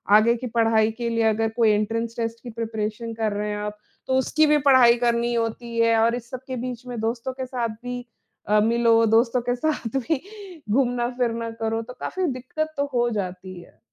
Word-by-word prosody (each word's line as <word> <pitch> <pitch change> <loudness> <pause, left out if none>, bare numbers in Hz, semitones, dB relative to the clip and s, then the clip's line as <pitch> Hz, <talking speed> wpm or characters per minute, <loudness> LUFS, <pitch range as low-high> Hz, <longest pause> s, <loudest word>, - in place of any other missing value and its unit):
आगे 230 +3 +5
की 250 +1 -5
पढ़ाई 225 -1 +2
के 235 +1 -3
लिए 230 -1 +1
अगर 220 +1 0
कोई 230 -2 +4
एंट्रेंस 225 +2 -1
टेस्ट 230 0 -3
की 245 - -7
प्रिपरेशन 225 0 -4
कर 220 -1 -1
रहे 210 +1 -2
हैं 210 - -3
आप, 210 0 -5 0.3
तो 260 - 0
उसकी 310 +4 +3
भी 300 - +5
पढ़ाई 250 -3 +7
करनी 235 0 +1
होती 230 0 -3
है। 230 0 +4
और 230 +1 +3
इस 240 -1 -8
सब 255 - -6
के 260 - -4
बीच 250 0 -6
में 240 -2 -5
दोस्तों 230 +3 -2
के 260 0 -5
साथ 250 -3 -2
भी 245 0 -5 0.4
अ, 210 +1 +4
मिलो 230 0 +4
दोस्तों 230 +3 +3
के 245 +1 -1
साथ 270 -3 -2
भी 270 +2 -1 0.5
घूमना-फिरना 240 -1 0
करो 225 0 0
तो 240 +2 -9
काफ़ी 375 0 -2
दिक्कत 310 +5 -4
तो 280 - +1
हो 240 -1 +2
जाती 185 -4 -5
है। - - -19
230 Hz, 205 wpm, -24 LUFS, 225-245 Hz, 0.5 s, पढ़ाई